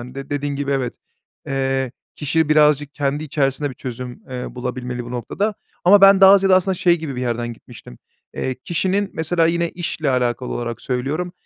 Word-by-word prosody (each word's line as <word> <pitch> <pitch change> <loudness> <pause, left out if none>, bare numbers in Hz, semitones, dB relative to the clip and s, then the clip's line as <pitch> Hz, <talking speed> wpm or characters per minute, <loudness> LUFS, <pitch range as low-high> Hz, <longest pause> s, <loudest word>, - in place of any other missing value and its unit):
hani, 125 +2 -10
de 135 +1 -8
dediğin 145 0 -2
gibi, 140 0 -3
evet, 130 -3 -1 0.5
eee, 135 -2 -1 0.2
kişi 155 +1 0
birazcık 150 -1 +3
kendi 145 +2 -1
içerisinde 140 -1 0
bir - - -10
çözüm, 125 0 -7
eee, 125 -1 -6
bulabilmeli 125 -1 -4
bu 120 - -9
noktada 195 - -2 0.3
ama 200 +3 +7
ben 195 0 +7
daha 195 +1 +9
ziyade 190 -1 +4
aslında 185 +1 +2
şey 175 -1 +3
gibi 150 -5 -5
bir 125 - -3
yerden 120 -1 -2
gitmiştim. 60 - -13 0.4
Eee, 130 - -2
kişinin, 190 +4 0
mesela, 165 +1 +1
yine 170 0 0
işle 160 -4 -2
alakalı 125 0 -1
olarak 120 -1 -4
söylüyorum, 140 +8 -2
140 Hz, 180 wpm, -20 LUFS, 125-170 Hz, 0.5 s, daha